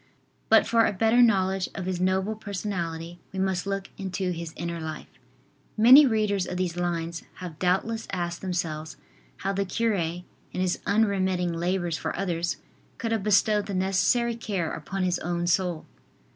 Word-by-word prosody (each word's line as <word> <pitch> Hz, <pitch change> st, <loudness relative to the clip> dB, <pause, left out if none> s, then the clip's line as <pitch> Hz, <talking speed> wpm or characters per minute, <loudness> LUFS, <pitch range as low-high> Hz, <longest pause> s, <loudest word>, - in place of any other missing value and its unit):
But 220 Hz, 0 st, +6 dB
for 230 Hz, 0 st, +4 dB
a -, -, -1 dB
better 225 Hz, +5 st, +4 dB
knowledge 190 Hz, -5 st, +3 dB
of 190 Hz, -, -4 dB
his 185 Hz, -1 st, -2 dB
noble 190 Hz, +3 st, +1 dB
personality 175 Hz, -5 st, -4 dB
we 190 Hz, -, -8 dB
must 190 Hz, 0 st, 0 dB
look 195 Hz, -1 st, -3 dB
into 190 Hz, -1 st, -2 dB
his 170 Hz, -2 st, -5 dB
inner 170 Hz, 0 st, -4 dB
life. 160 Hz, -1 st, -6 dB, 0.7 s
Many 260 Hz, +6 st, +9 dB
readers 210 Hz, -5 st, +1 dB
of 180 Hz, -, -4 dB
these 180 Hz, -2 st, -1 dB
lines 170 Hz, -1 st, -2 dB
have 175 Hz, -4 st, -8 dB
doubtless 195 Hz, +5 st, 0 dB
asked 175 Hz, -2 st, -3 dB
themselves 160 Hz, -4 st, -3 dB, 0.5 s
how 195 Hz, -, +1 dB
the 200 Hz, +1 st, 0 dB
cure, 225 Hz, +4 st, 0 dB
in 175 Hz, -1 st, -2 dB, 0.3 s
his 185 Hz, -1 st, 0 dB
unremitting 190 Hz, -4 st, +1 dB
labors 175 Hz, 0 st, -1 dB
for -, -, -3 dB
others, 175 Hz, -2 st, -1 dB, 0.4 s
could 230 Hz, -, -3 dB
have 225 Hz, -2 st, +1 dB
bestowed 210 Hz, +1 st, +3 dB
the 200 Hz, -, -3 dB
necessary 200 Hz, +6 st, +2 dB
care 195 Hz, -8 st, -3 dB
upon 190 Hz, +5 st, -4 dB
his 180 Hz, -1 st, +1 dB
own 175 Hz, 0 st, -2 dB
soul. 175 Hz, -2 st, 0 dB
185 Hz, 160 wpm, -26 LUFS, 175-200 Hz, 0.7 s, Many